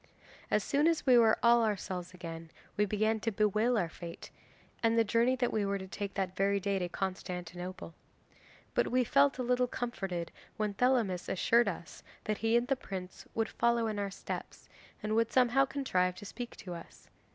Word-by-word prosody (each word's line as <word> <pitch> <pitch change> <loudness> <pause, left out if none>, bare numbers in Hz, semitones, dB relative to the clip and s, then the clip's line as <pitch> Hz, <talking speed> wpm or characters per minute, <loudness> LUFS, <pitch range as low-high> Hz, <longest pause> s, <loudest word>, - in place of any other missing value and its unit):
'As - - +2
soon 290 +2 +2
as 330 -1 +1
we 255 -2 +6
were 225 -2 +6
all 235 0 +6
ourselves 185 -4 -2
again 165 -2 -8 0.3
we 210 - +3
began 215 +2 +1
to 225 +2 -1
bewail 215 +4 +2
our 180 -5 +1
fate, 170 +1 -9 0.5
and 230 0 +3
the 230 - +6
journey 230 +4 +2
that 245 -1 0
we 215 - +1
were 200 0 0
to 190 -1 -7
take 200 +1 -5
that 190 -2 -2
very 200 +1 +2
day 200 0 0
to 180 -1 -2
Constantinople. 180 -1 -5 0.8
But - - +2
we 255 0 +2
felt 275 +3 +3
a 255 - -2
little 250 0 +2
comforted 195 -9 -4 0.3
when 210 -1 -1
Thelamis 225 -6 +1
assured 235 +5 +3
us 175 -2 -5 0.2
that 215 -1 -2
he 225 +2 +3
and 240 +1 0
the 270 - +2
prince 190 -6 -7
would 225 -1 0
follow 235 -1 +2
in 215 -2 -2
our 200 -1 -1
steps, 190 - -7 0.4
and 215 0 -1
would 230 0 +2
somehow 255 +1 +4
contrive 185 -11 0
to 205 - -10
speak 240 +3 -7
to 180 - -8
us. 170 -1 -11
210 Hz, 190 wpm, -32 LUFS, 185-240 Hz, 0.8 s, we